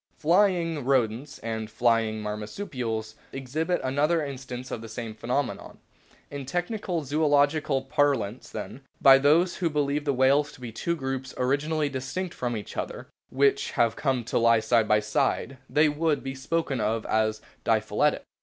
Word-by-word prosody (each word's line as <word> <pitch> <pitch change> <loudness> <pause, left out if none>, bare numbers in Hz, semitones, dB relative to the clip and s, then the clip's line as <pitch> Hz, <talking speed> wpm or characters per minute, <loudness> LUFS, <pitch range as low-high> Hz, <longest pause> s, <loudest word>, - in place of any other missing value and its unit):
"Flying' 170 -3 +2
Rodents 130 +1 0
and 110 -1 -3
"Flying' 115 -1 +1
Marsupials 110 - -4 0.2
exhibit 155 +7 -2
another 150 +5 +1
instance 130 -2 -7
of 110 - -4
the 115 - -9
same 115 0 -6
phenomenon. 125 +5 -3 0.5
In 140 -1 -5
technical 175 - -2
zoological 145 -1 +2
parlance 135 -6 0
then, 135 - -7 0.2
by 135 -1 +8
those 165 +6 +3
who 175 -3 0
believe 145 -1 0
the 145 - +2
whales 140 +3 +3
to - - -15
be 120 -2 -7
two 170 +9 -2
groups 135 -3 -4
originally 145 +4 0
distinct 140 +7 -4
from 120 -2 -2
each 105 - -8
other - - -5 0.2
which 140 +1 +2
have 115 -1 +2
come 130 -4 0
to 115 - 0
lie 115 -1 +5
side 110 0 +2
by 105 0 +4
side, 110 +4 -1
they 150 +1 +4
would 150 0 0
be 135 - -4
spoken 135 0 -2
of 110 +1 -1
as 110 0 +1
" - - -35
diphyletic." - - +1
135 Hz, 155 wpm, -26 LUFS, 115-150 Hz, 0.5 s, by